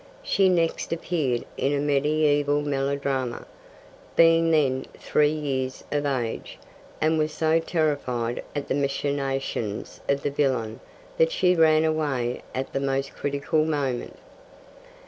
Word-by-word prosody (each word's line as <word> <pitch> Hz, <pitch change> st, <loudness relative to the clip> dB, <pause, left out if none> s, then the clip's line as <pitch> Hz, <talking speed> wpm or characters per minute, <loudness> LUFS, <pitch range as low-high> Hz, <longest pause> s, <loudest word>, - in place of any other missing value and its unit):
She 195 Hz, -1 st, +3 dB
next 170 Hz, -2 st, 0 dB
appeared 155 Hz, -7 st, -1 dB
in 140 Hz, -, +1 dB
a -, -, 0 dB
mediaeval 145 Hz, 0 st, +2 dB
melodrama, 135 Hz, -3 st, -1 dB, 0.7 s
being 165 Hz, 0 st, +5 dB
then 135 Hz, -5 st, +2 dB
three 150 Hz, -1 st, +2 dB
years 135 Hz, -4 st, -3 dB
of 145 Hz, 0 st, 0 dB
age, 125 Hz, -5 st, -3 dB, 0.4 s
and 155 Hz, +1 st, +2 dB
was 155 Hz, 0 st, +1 dB
so 160 Hz, +1 st, +2 dB
terrified 140 Hz, -8 st, -1 dB
at 145 Hz, -1 st, -3 dB
the -, -, 0 dB
machinations 135 Hz, -5 st, -2 dB
of 140 Hz, 0 st, +1 dB
the 145 Hz, -, 0 dB
villain 125 Hz, -6 st, 0 dB, 0.4 s
that 485 Hz, 0 st, +4 dB
she 180 Hz, -, +3 dB
ran 160 Hz, -1 st, +5 dB
away 145 Hz, -6 st, -1 dB
at 130 Hz, +1 st, -3 dB
the -, -, 0 dB
most 135 Hz, 0 st, -1 dB
critical 145 Hz, +2 st, 0 dB
moment. 140 Hz, -6 st, -2 dB
145 Hz, 125 wpm, -25 LUFS, 135-155 Hz, 0.7 s, being